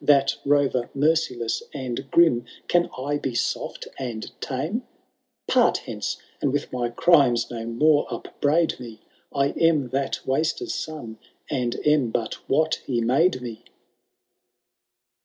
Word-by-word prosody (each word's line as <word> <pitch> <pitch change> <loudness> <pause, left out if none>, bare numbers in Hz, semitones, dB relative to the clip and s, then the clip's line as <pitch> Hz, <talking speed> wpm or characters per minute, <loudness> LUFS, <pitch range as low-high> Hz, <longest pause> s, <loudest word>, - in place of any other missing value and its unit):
That 140 -2 +4
rorer 140 -4 +2
merciless 140 -6 +1
and 130 -1 -4
grim. 130 -9 +4 0.2
Can 175 0 +3
I 145 +3 -1
be 130 -4 -3
soft - - -2
and 120 -4 -5
tame? 155 - -2 0.7
Part - - +4
hence, - - -3 0.2
and 140 - +2
with 145 -1 -2
my 120 -1 -1
crimes 125 -2 +4
no 115 -1 -5
more 145 +6 +3
upbraid 160 +2 0
me, 115 -3 -10 0.3
I 140 0 +2
am 155 -6 +2
that 135 +2 -1
Waster^k 155 - 0
son, 130 - -6 0.3
and 125 -4 0
am 150 -5 +4
but 115 0 -4
what 155 +3 +2
he 125 -3 0
made 130 +5 +2
me. 115 -3 -7
135 Hz, 130 wpm, -24 LUFS, 120-150 Hz, 0.7 s, That